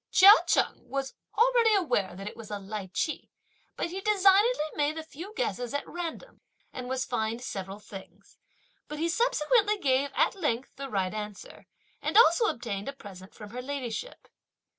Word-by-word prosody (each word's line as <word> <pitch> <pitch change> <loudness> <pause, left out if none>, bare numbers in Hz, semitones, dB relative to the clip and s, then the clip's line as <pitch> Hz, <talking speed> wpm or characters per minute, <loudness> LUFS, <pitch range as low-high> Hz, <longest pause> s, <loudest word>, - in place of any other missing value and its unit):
Chia 390 +2 +9 0.2
Cheng - - 0
was 270 +1 -3 0.2
already 465 -2 +4
aware 205 - 0
that 195 +2 -7
it - - -7
was 225 -2 -10
a 205 - -3
lichee, 200 - -4 0.5
but 335 - -3
he 380 +2 -5
designedly 400 0 +4
made 295 +1 0
a 320 - -4
few 330 +5 -9
guesses 285 - -2
at 285 - -3
random, 350 +7 -7 0.3
and 250 -1 -6
was 260 0 -1
fined 230 0 -2
several 195 -4 -5
things; 200 -2 -13 0.5
but 300 - -6
he 325 +2 0
subsequently 425 +2 +2
gave, 280 -5 +1
at - - +3
length, 270 -9 -2
the 275 0 -6
right 190 -4 -1
answer, 210 -2 -8 0.3
and - - 0
also 440 0 +6
obtained 220 - -3
a - - -5
present 195 -7 -12
from 210 -1 -10
her 250 +2 -5
ladyship. 275 - -5
275 Hz, 165 wpm, -28 LUFS, -, 0.5 s, Chia